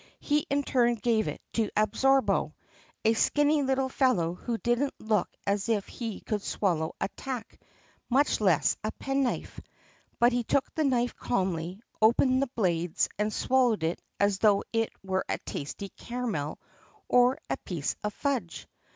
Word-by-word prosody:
He 295 0 0
in 285 +1 +1
turn 240 -3 +2
gave 225 -1 +1
it - - -5
to 220 -3 +1
Absorbo, 265 +6 +2 0.5
a 225 - +5
skinny 295 +5 +3
little 265 -1 +1
fellow 250 -11 +2
who 230 +6 -3
didn't 240 +4 0
look 215 -3 0 0.2
as 200 +2 0
if 210 -4 +1
he 225 -4 -6
could 210 -2 -2
swallow 170 -6 -1
a - - 0
tack, 250 -2 -7 0.5
much 270 -1 +2
less 185 -7 +3
a 215 - -1
penknife. 270 -2 -2 0.6
But 240 +1 +4
he 245 0 +1
took 265 +4 0
the 315 - 0
knife 245 -2 +1
calmly, 185 -2 -2 0.2
opened 255 +4 +4
the 275 - +1
blades, 175 -8 0
and 210 +1 +1
swallowed 245 -6 +2
it 165 +2 -1 0.2
as 200 -1 +2
though 205 -2 +4
it 225 0 +1
were 190 -1 -1
a - - 0
tasty 170 +7 -6
caramel 225 -14 -4 0.5
or 250 +1 +4
a - - 0
piece 165 -6 -3
of 210 - -1
fudge. 255 - -2
225 Hz, 155 wpm, -28 LUFS, 200-260 Hz, 0.6 s, a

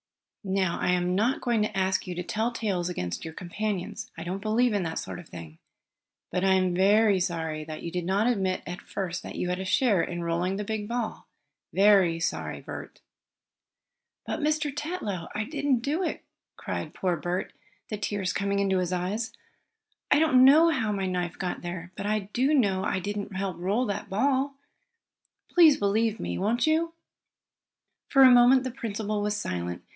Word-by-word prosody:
"Now 190 -3 0
I - - 0
am 180 0 +1
not 220 +8 +1
going 235 -3 +1
to 210 -1 -1
ask 190 0 0
you 180 - -4
to 180 - -3
tell 220 +6 -1
tales 195 -7 -2
against 90 - -4
your 160 0 -7
companions. 190 +1 -4
I 165 - -5
don't 185 +3 -4
believe 225 +3 +2
in 205 - +1
that 165 -2 -3
sort - - -5
of 175 - -13
thing. 80 -2 -10 0.7
But 180 +1 -1
I 190 0 +4
am 185 -1 +2
very 200 +2 +4
sorry 160 -4 -2
that 155 0 -7
you 170 - -4
did 180 -1 -3
not 195 +4 +1
admit 195 -6 0
at 175 +1 -6
first 185 -3 -4
that - - -8
you 180 - -2
had 180 +1 -1
a 190 - -4
share 205 -1 +3
in 175 -1 -3
rolling 170 +3 0
the 205 - -3
big 210 0 -3
ball. 235 -1 -4 0.4
Very 190 -3 +4
sorry, 165 - -2
Bert." - - -9 1.2
"But, - - -3
Mr. 300 -2 0
Tetlow, 295 - -4
I 210 - 0
didn't 280 -1 0
do 295 +8 -1
it!" 360 - -3 0.3
cried - - -5
poor 180 -2 0
Bert, 175 +3 -3 0.4
the 210 - -3
tears 205 -3 -2
coming 200 0 0
into 195 -1 +2
his 180 -1 -1
eyes. 190 +6 -2 0.8
"I - - +5
don't 290 -5 +5
know 310 +5 +7
how 225 -8 0
my 195 -2 -1
knife 180 -2 -2
got 185 -2 -3
there, 175 0 -6
but 200 - -4
I 215 0 +1
do 270 +5 +3
know 195 -8 +2
I 195 - 0
didn't 200 +1 -4
help 190 -3 -3
roll 200 +8 +1
that 200 -2 -4
ball. 270 +6 +1 1.0
Please 325 -5 +7
believe 220 +2 +1
me; - - -3
won't 220 +5 +1
you?" 325 +1 +1 1.2
For 270 -1 +6
a 260 - +9
moment 245 +1 +6
the 255 - -3
principal 215 -3 -3
was 210 0 -1
silent. 90 - -4
200 Hz, 185 wpm, -27 LUFS, 180-235 Hz, 1.2 s, a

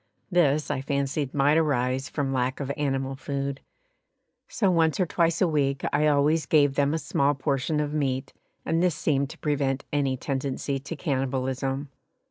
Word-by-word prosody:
This 150 -4 +2
I 140 -2 -1
fancied 140 0 -1
might 145 +2 +3
arise 135 -2 0
from 140 -3 -2
lack 130 0 -1
of 140 -1 -3
animal 135 -2 -1
food, 140 0 -3 0.9
so 200 -4 +1
once 165 -1 +2
or 185 - +3
twice 170 -1 +1
a 185 - +5
week 140 -4 0
I 150 +2 +3
always 150 +1 +2
gave 145 -2 +4
them 140 +2 +1
a - - +1
small 145 -2 +1
portion 140 +2 -1
of 150 0 -1
meat 135 -3 -1 0.3
and 165 +1 +1
this 180 -3 +2
seemed 140 -3 0
to - - -10
prevent 140 -3 -1
any 135 -3 +1
tendency 135 +1 -2
to 140 +5 -6
cannibalism. 135 -1 -2
140 Hz, 165 wpm, -26 LUFS, 135-150 Hz, 0.9 s, a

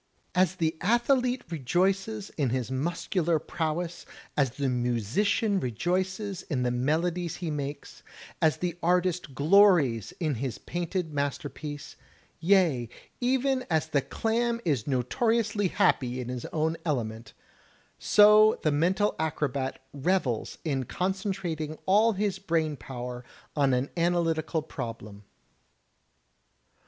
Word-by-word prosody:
As 185 -1 +2
the 160 -3 0
athlete 245 +4 +2
rejoices 190 - 0
in 140 -5 -1
his 125 -1 -2
muscular 165 +4 0
prowess, 165 +2 -3 0.3
as 140 -3 +2
the 140 -1 -1
musician 125 - +1
rejoices 185 - -2
in 130 -5 -2
the 125 - +1
melodies 165 +7 0
he 170 -3 -4
makes, 145 -1 -5 0.4
as 155 -1 +3
the 175 -1 -3
artist 180 -4 +1
glories 150 - +4
in 155 -4 0
his 130 -6 -3
painted 175 -1 -3
masterpiece, 145 +1 -4 0.4
yea, 165 - +3 0.3
even 260 +1 +1
as 160 -1 +1
the 145 -3 +2
clam 230 - -1
is 140 -9 0
notoriously 205 - +1
happy 125 -7 +1
in 125 -1 -5
his 125 -1 -4
own 160 0 -1
element, 115 -7 -3 0.7
so 210 +1 +6
the 155 - +3
mental 185 +8 +2
acrobat 140 -4 -1 0.2
revels 145 - -1
in 135 -4 0
concentrating 180 - -3
all 215 +4 +4
his 195 -1 -1
brain 160 -5 0
power 125 -2 -7 0.3
on 140 -3 +3
an 125 +2 0
analytical 165 -2 0
problem. 115 -8 -7
160 Hz, 115 wpm, -28 LUFS, 135-190 Hz, 0.7 s, so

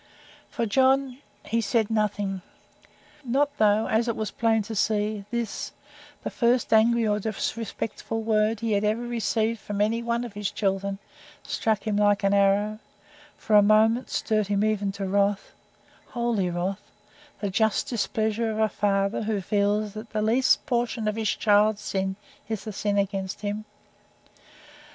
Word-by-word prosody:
For 235 - -2
John 265 +3 +2 0.3
he 230 +1 0
said 225 -1 0
nothing. 205 -3 -1 0.8
Not 280 +3 +1
though, 215 0 +4
as 225 +2 +1
was 220 -2 -2
plain 225 -2 +1
to 220 +2 -7
see, 210 -1 0
this, 235 -2 -3 0.5
the - - -3
first 240 -1 +1
angry 230 +1 +4
or 210 0 +1
disrespectful 225 +1 -4
word 215 0 +1
he 230 -1 -1
had 205 0 +1
ever 215 +3 0
received 230 -1 -1
from 205 -1 -5
any 220 +3 +1
one 235 0 -1
of 240 -4 -7
his 205 -1 -2
children, 195 -1 -1 0.5
struck 225 -7 -1
him 210 -2 0
like 205 -1 +3
an 195 0 +3
arrow; 200 +2 +2 0.6
for 215 - +1
a 205 - +9
moment 220 +4 +3
stirred 215 -3 0
him 205 +1 +1
even 205 -2 0
to 195 0 -4
wrath 200 +1 0 0.6
holy 235 -6 -1
wrath 180 +3 -2 0.6
the 200 -2 -2
just 220 +1 +1
displeasure 225 -1 -1
of 215 - -3
a 220 0 +2
father 195 0 0
who 215 -1 -1
feels 205 +2 0
that 215 +1 -8
the 215 -1 0
least 240 +4 +3
portion 240 -4 -1
of 210 - 0
his 220 -1 -1
child's 210 0 +3
sin 190 -2 -2 0.3
is 220 -3 -3
the 215 - -6
sin 205 +1 -1
against 195 -1 -2
him. 210 +1 -3
215 Hz, 155 wpm, -26 LUFS, 205-230 Hz, 0.8 s, a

